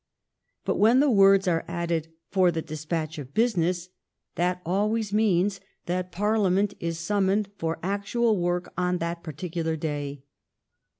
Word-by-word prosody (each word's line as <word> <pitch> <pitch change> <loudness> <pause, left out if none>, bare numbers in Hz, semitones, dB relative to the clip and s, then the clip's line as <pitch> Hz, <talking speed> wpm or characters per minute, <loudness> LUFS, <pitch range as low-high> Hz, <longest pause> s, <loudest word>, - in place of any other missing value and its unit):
But - - 0
when 230 +5 +5
the 285 -1 +4
words 195 -2 +5
are 165 -2 +2
added 170 -2 -2
" 165 - -56
for 185 -2 +4
the 160 -1 -3
despatch 155 0 -4
of 140 -1 -9
business," 180 -6 +1 0.4
that 180 +1 0
always 210 +4 0
means 200 -2 +2 0.2
that 180 +1 -2
Parliament 205 -1 +1
is 165 -1 -3
summoned 200 +3 +1
for 165 0 -1
actual 205 +4 +1
work 175 0 -1
on 180 0 0
that 170 0 -3
particular 165 +1 -3
day. 145 -3 -4
180 Hz, 140 wpm, -26 LUFS, 165-200 Hz, 0.4 s, when